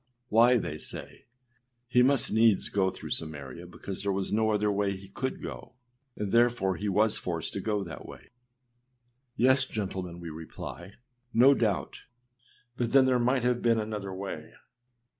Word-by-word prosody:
â 120 +3 +6
âWhy,â 120 - +2
they 75 - -4
say, - - -9 0.7
âhe 125 - +6
must 135 0 +3
needs 110 -2 +4
go 95 -2 +2
through - - -9
Samaria, 80 +1 -5
because 90 +2 -7
there 100 0 0
was 95 +1 -2
no 110 +1 +2
other 105 -1 +2
way 100 -1 0
he 95 +1 -12
could 130 +6 -4
go, - - -8 0.4
and 105 -2 -3
therefore 115 -5 +3
he 105 +4 -2
was 105 +3 +2
forced 85 -2 -3
to 100 - -3
go 105 0 -1
that 85 -3 -9
way.â - - -12 1.1
Yes, 130 +2 +4
gentlemen, 95 -6 -4
we 85 -2 -7
reply, 80 +4 -8 0.4
no 130 +4 +7
doubt; 110 -7 -1 0.8
but 120 -2 -1
then 135 -1 +7
there 130 -1 +3
might 125 +1 +2
have 125 0 +1
been 115 -1 +3
another 105 -2 -4
way. 95 +1 -6
105 Hz, 165 wpm, -29 LUFS, 95-120 Hz, 1.1 s, no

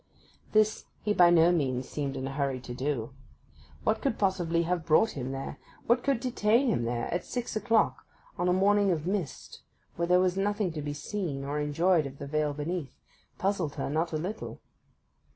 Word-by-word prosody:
This 215 0 +2 0.2
he 210 - +1
by 175 -3 +6
no 170 0 +6
means 130 -6 0
seemed 140 -2 -3
in 130 - -3
a - - -4
hurry 135 -2 -1
to 125 - -7
do. 130 -2 -2 0.7
What 220 - +1
could 270 -5 0
possibly 175 -4 +1
have 175 0 -1
brought 165 +8 +4
him 130 -1 -4
there, 135 0 -5 0.3
what 240 +1 +3
could 275 -4 +1
detain 240 0 +2
him 120 - +1
there, 120 0 -1
at 175 - -1
six 245 -2 -4
o'clock 220 +1 +2 0.3
on 175 - -1
a - - +4
morning 200 +2 +3
of 165 -4 0
mist 185 -6 -4 0.4
when 170 0 0
there 180 0 +6
was 185 0 +2
nothing 205 -1 0
to 155 -1 -5
be 145 0 -3
seen 150 -3 -3
or 145 +2 -2
enjoyed 155 +2 +2
of 135 0 -11
the 140 - -6
vale 150 0 0
beneath, 150 -1 -4 0.4
puzzled 185 -6 -1
her 140 -1 -3
not 160 +3 0
a 155 - -1
little. 190 +8 -5
170 Hz, 190 wpm, -29 LUFS, 145-200 Hz, 0.7 s, by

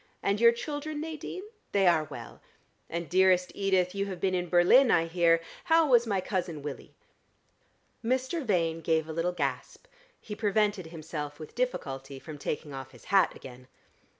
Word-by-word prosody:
"And 200 +2 +1
your 235 0 +8
children, 295 +5 -5
Nadine? 320 +4 -6 0.3
They 195 -1 +3
are 165 -3 +4
well. 145 - -10 0.5
And, 170 0 -4
dearest 185 +1 +3
Edith, 190 -2 +1
you 200 0 -2
have 185 -3 -6
been 190 -1 0
in 180 -1 -1
Berlin, 180 +10 +6
I 165 - +4
hear. 165 0 +3 0.2
How 325 -1 +4
was 240 -3 +4
my 200 -3 +1
cousin 180 -5 -3
Willie?" 145 -3 -7 1.1
Mr. 260 +7 -1
Vane 165 -7 0
gave 160 -1 +1
a 160 - -5
little 165 +2 0
gasp; 140 -6 -4 0.3
he 210 - -8
prevented 205 -3 0
himself 155 -3 -6
with 155 -2 -10
difficulty 135 - -3
from 150 +2 -9
taking 145 0 -4
off 135 -1 -8
his - - -16
hat 195 - +4
again. 125 -1 -12
180 Hz, 165 wpm, -29 LUFS, 160-215 Hz, 1.1 s, your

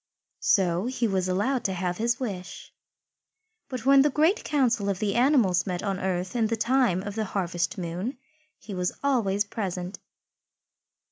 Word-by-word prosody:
So 185 +1 +2
he 250 -2 0
was 190 -2 0
allowed 225 +7 0
to 190 - +1
have 180 -1 -2
his 235 +2 0
wish. 195 -8 -6 1.0
But 255 -2 -5
when 275 0 +7
the 295 - +4
Great 320 - +2
Council 245 -8 +1
of 195 - 0
the 200 0 -1
animals 235 - +3
met 180 -2 -3
on 195 -2 -1
earth 185 +2 -2
in 230 -2 +2
the 230 +1 -1
time 230 -6 +2
of 205 - -5
the 220 +1 -2
harvest 175 -1 -2
moon, 180 +8 -4 0.4
he 210 - -9
was 180 -1 -1
always 215 -8 +2
present. 185 -3 -4
205 Hz, 160 wpm, -26 LUFS, 185-245 Hz, 1.0 s, when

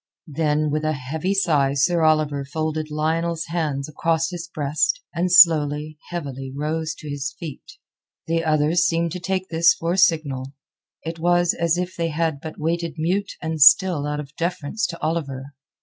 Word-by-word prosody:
Then 150 0 0
with 155 +1 -1
a 155 0 0
heavy 155 +8 -3
sigh 145 -8 +2
Sir 165 +5 +2
Oliver 155 -3 +2
folded 155 +2 -3
Lionel's 160 +2 -1
hands 150 -5 -2
across 165 +2 -1
his 175 -1 -6
breast, 150 - 0
and 175 +1 -1
slowly, 155 -3 +5
heavily 135 -6 -5
rose 155 +1 -2
to 155 - -11
his 140 -1 -4
feet. 165 - -9 0.5
The 165 0 0
others 155 +2 +2
seemed 170 -1 0
to 180 - -5
take 185 +1 -3
this 165 0 +4
for 165 +1 -2
a 190 - 0
signal. 145 -7 +1 0.5
It 165 0 -6
was 175 +1 +2
as 170 0 0
if 180 0 -3
they 170 -1 -1
had 160 -2 -1
but 160 - -8
waited 165 +1 -2
mute 185 +6 -1
and 160 -1 -3
still 160 -1 +6
out 150 0 -3
of 150 0 -9
deference 175 +5 -2
to 170 - -8
Oliver. 140 -4 -3
160 Hz, 170 wpm, -22 LUFS, 150-170 Hz, 0.5 s, still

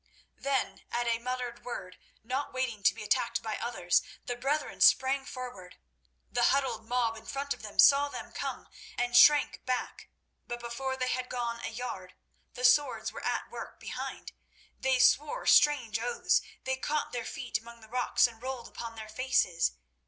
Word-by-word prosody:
Then, 275 -1 -1
at 240 0 0
a 230 -1 +1
muttered 250 0 -4
word, 185 -7 -7 0.2
not 260 +5 -3
waiting 255 -5 -2
to 200 - +4
be - - -7
attacked 235 +1 0
by 220 -1 -3
others, 180 -7 +1 0.2
the 245 - -3
brethren 275 +5 -2
sprang 265 +1 +5
forward. 245 -10 -8 0.5
The 240 -1 +2
huddled 270 -5 +1
mob 240 -2 +1
in 220 - -13
front 280 +1 -2
of - - -14
them 210 -2 -9
saw 285 +1 +7
them - - -8
come, - - -5 0.3
and 245 0 0
shrank 295 +3 +6
back, 255 -1 -3 0.4
but 240 0 -4
before 260 +3 -4
they 255 -1 -1
had 255 0 -2
gone 235 -2 -3
a - - -2
yard, 225 -6 -6 0.4
the 250 - -1
swords 275 +4 +3
were - - -9
at - - -2
work - - -8
behind. - - -6 0.5
They 265 -1 +2
swore 295 - +3
strange 255 -7 +4
oaths, 240 +1 +1 0.2
they 260 0 -1
caught 295 +3 -2
their 240 -1 -3
feet 245 +1 -3
among 235 +1 -13
the 220 - -14
rocks, 250 +2 +2
and 230 -2 -4
rolled 255 -2 -5
upon 230 -1 -7
their 220 -1 -8
faces. 215 -7 +1
245 Hz, 175 wpm, -30 LUFS, 230-265 Hz, 0.5 s, saw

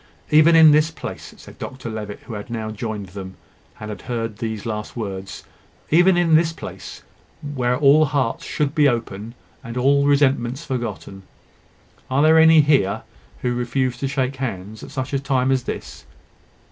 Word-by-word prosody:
"Even 155 +2 +6
in 160 -1 +8
this 155 +1 +4
place," 165 - -8
said - - -15
Dr 130 -2 -7
Levitt, 105 -2 -6
who 115 - -10
had 105 +2 -7
now 110 -2 -4
joined 110 -3 -5
them, 95 0 -8 0.4
and 105 0 -6
had 105 - -8
heard 115 -3 -4
the 110 -1 -3
last 105 -1 -5
words: 95 -4 -6 0.5
"even 175 +3 +5
in 170 -2 +2
this 160 +1 +4
place, 165 - -9 0.5
where 125 -2 0
all 150 +2 +5
hearts 140 -5 -1
should 145 -2 -2
be 150 -2 +4
open, 115 -2 -4 0.3
and 115 +1 -7
all 140 +3 +3
resentments 140 0 +1
forgotten. 115 -7 -5 0.9
Are 135 +3 +2
there 160 +1 +6
any 160 -1 +7
here 140 -10 +2 0.4
who 125 -1 0
refuse 125 +1 -1
to 135 - -1
shake 135 -1 -2
hands 110 -5 -5
at - - -9
such 130 +1 -5
a 140 - +1
time 135 -1 0
as 130 -2 0
this?" - - -6
130 Hz, 170 wpm, -21 LUFS, 110-145 Hz, 0.9 s, in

